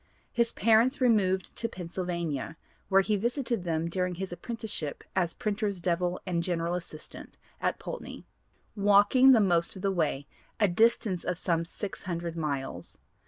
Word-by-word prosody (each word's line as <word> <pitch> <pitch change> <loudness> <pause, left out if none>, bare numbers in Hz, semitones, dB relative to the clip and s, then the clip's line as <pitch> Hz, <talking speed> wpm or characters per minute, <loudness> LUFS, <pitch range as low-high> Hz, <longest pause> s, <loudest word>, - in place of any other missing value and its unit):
His 235 -1 +2
parents 230 +5 +3
removed 200 -7 +2
to 230 - -1
Pennsylvania, 170 - -4 0.3
where 195 0 +6
he 210 +2 +1
visited 235 0 -1
them 165 -1 0
during 180 +1 -1
his 190 +1 -5
apprenticeship 215 -8 -5
as 175 -3 0
"printers' 205 -2 -2
devil," 175 +1 0
and 175 -3 0
general 170 -1 -1
assistant 165 -3 -7 0.2
at - - 0
Poultney, - - -7 0.5
walking 205 +6 +6
the 245 - +7
most 175 -4 +3
of 185 - -9
the 195 - +2
way, 155 -6 -1 0.3
a 210 - +5
distance 200 -1 +2
of 175 - -2
about 165 -1 +1
600 170 -3 -4
miles. 140 - -4
185 Hz, 145 wpm, -29 LUFS, 170-215 Hz, 0.5 s, the